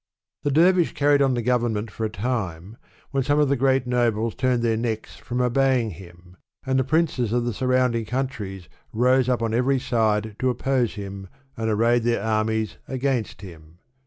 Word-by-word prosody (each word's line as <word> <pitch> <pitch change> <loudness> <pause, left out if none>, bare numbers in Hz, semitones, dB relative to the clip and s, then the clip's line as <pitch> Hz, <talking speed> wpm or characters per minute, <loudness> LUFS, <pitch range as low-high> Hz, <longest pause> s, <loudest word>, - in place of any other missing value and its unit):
The 145 - -1
dervish 175 +4 +3
carried 145 -2 +3
on 135 -2 +3
the 120 - -2
govern 120 -1 +1
ment 105 0 -4
for 110 - -3
a - - -1
time, 100 -4 -4 0.4
when 135 -1 0
some 145 +3 +1
of 150 -2 +3
the 140 - +3
great 135 0 +2
nobles 115 -3 0
turned 130 -2 0
their 115 -1 +2
necks 110 -1 -3
from 125 0 -5
obeying 125 -2 +2
him, 90 0 -14 0.3
and 130 0 +1
the - - +2
princes 140 -5 0
of 120 0 0
the 120 - -1
surrounding 125 -1 +1
countries 105 -8 -4 0.2
rose 125 +2 +2
up 125 -2 +1
on 115 -1 -1
every 130 +3 +2
side 110 -4 0
to 130 - +1
oppose 125 -1 0
him, 100 -1 -7 0.3
and 110 0 -2
arrayed 115 +3 +2
their 115 -3 0
armies 110 0 -1
against 130 -6 -2
him. 80 -4 -13
120 Hz, 185 wpm, -23 LUFS, 110-130 Hz, 0.4 s, dervish